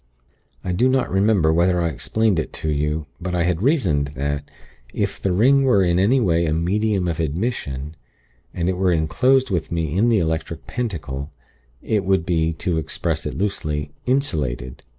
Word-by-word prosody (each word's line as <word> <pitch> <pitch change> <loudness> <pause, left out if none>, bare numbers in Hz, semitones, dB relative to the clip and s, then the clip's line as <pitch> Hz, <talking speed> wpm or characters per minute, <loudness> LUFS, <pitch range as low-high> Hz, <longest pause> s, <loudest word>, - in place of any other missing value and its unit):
"I 90 - -2
do 120 +9 +2
not 130 -1 +1
remember 95 -4 +3
whether 90 +2 +3
I 85 -1 +1
explained 105 - 0
it 80 - -3
to 80 - -2
you. 75 +1 -1 0.2
But 90 0 -3
I 85 - +2
had 85 0 0
reasoned 90 - +1
that, 70 +2 -3 0.4
if - - -2
the 95 - 0
ring 130 +9 +4
were 105 -8 +4
in 85 0 +2
any 115 +8 +4
way 85 -7 +2
a 75 - +1
'medium 95 +3 0
of 85 -1 -2
admission,' 75 - -3 0.6
and 85 0 -2
it 95 -1 0
were 95 -1 +2
enclosed 125 +11 +2
with 85 -5 -1
me 80 -2 -1
in 110 +5 +3
the 115 - +4
Electric 80 -2 -2
Pentacle, 75 - -4 0.5
it 105 -3 0
would 95 -3 +1
be, 80 -2 +1
to 80 +1 -1
express 80 - -2
it - - -5
loosely, 75 -7 -2 0.2
insulated. 75 - -1
85 Hz, 175 wpm, -22 LUFS, 80-105 Hz, 0.6 s, ring